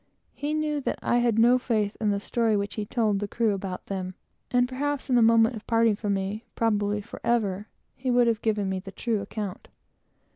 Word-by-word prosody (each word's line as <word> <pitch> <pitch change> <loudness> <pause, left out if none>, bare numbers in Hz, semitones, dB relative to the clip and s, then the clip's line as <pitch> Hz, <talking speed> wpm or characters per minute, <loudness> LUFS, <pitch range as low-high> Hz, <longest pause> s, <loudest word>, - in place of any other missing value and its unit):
He 295 +1 -2
knew 305 -1 -1
that - - -2
I 240 - +2
had 235 -2 +2
no 240 +2 +5
faith 215 -4 0
in 215 - +2
the 200 -1 +1
story 225 +1 +1
which 200 0 -2
he 210 -2 -4
told 215 -4 +1
the 205 - -3
crew, 210 -2 0 0.9
and 245 0 +3
perhaps, 280 +1 -3
in - - +4
the 240 - +5
moment 225 +1 +5
of 215 - -10
parting 230 -2 +3
from 205 -1 -1
me, 195 +3 -3
probably 210 -2 +1
forever, 205 -2 -1 0.3
he 255 0 -4
would 245 0 +4
have 230 -1 +1
given 210 -3 0
me 190 0 -1
the 195 +1 -9
true 225 0 -1
account. 200 -1 -6
225 Hz, 195 wpm, -26 LUFS, 205-240 Hz, 0.9 s, no